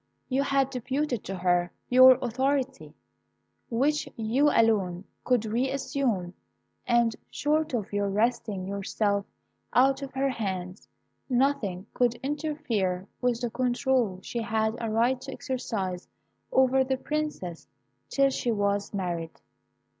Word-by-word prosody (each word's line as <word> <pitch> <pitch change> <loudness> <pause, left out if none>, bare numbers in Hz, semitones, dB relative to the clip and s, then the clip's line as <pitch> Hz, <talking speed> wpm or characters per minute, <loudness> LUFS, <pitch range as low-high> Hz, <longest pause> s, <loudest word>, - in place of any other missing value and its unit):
You 265 +1 +2
had 275 -1 +1
deputed 260 -1 -2
to 195 - -4
her 175 -1 +1 0.2
your 255 0 +8
authority, 265 +2 -1 0.7
which 290 +6 +1
you 240 +7 +2
alone 200 -8 +2 0.2
could 245 -3 +2
re 235 +5 0
assume, 255 - -1 0.5
and 235 -2 +3
short 305 -1 0
of 210 -3 -4
your 205 0 +1
wresting 210 -2 0
her 200 +1 -4
yourself 200 0 0 0.5
out 270 +2 +4
of 275 -1 -6
her 270 +1 +1
hands, 190 -5 -4 0.4
nothing 245 -8 +1
could 245 -1 +2
interfere 270 - -1
with 245 -2 +1
the 240 -2 -2
control 250 -4 +1
she 235 - -3
had 220 -1 0
a 225 - -2
right 240 +4 +2
to 270 - -7
exercise 195 -10 -3 0.4
over 265 0 +4
the 265 0 -1
Princess 300 - -4 0.4
till 275 -1 +3
she 245 -2 -1
was 205 -1 0
married. 170 -4 -3
240 Hz, 130 wpm, -27 LUFS, 200-265 Hz, 0.7 s, your